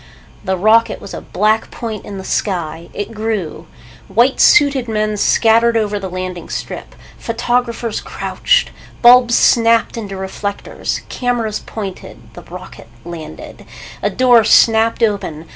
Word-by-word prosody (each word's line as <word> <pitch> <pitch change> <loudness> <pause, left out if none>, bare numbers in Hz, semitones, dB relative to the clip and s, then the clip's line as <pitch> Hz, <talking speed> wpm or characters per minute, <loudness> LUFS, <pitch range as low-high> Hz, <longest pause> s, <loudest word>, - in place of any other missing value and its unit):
The 190 -1 -1
rocket 220 +4 +3
was 200 - -10
a - - -6
black 215 +3 0
point 225 -3 -6
in 200 - -7
the 190 - -7
sky. 170 -5 -3
It 205 +2 -6
grew. 215 -6 -4 0.4
White 235 +7 +2
suited 280 -4 +4
men 215 -1 -1
scattered 230 +2 +3
over 210 -2 -1
the 190 -1 -6
landing 185 -1 -6
strip. - - -7 0.2
Photographers 235 -1 -2
crouched. - - 0 0.3
Bulbs 240 0 +6
snapped 230 0 +3
into 200 -4 -6
reflectors. 190 +1 -5
Cameras 240 -4 -2
pointed. 200 -4 -9
The - - -11
rocket - - -11 0.2
landed. 170 -2 -9 0.4
A - - 0
door 245 -3 +4
snapped 225 +1 +4
open. 195 -7 -2
220 Hz, 130 wpm, -16 LUFS, 195-230 Hz, 0.4 s, Bulbs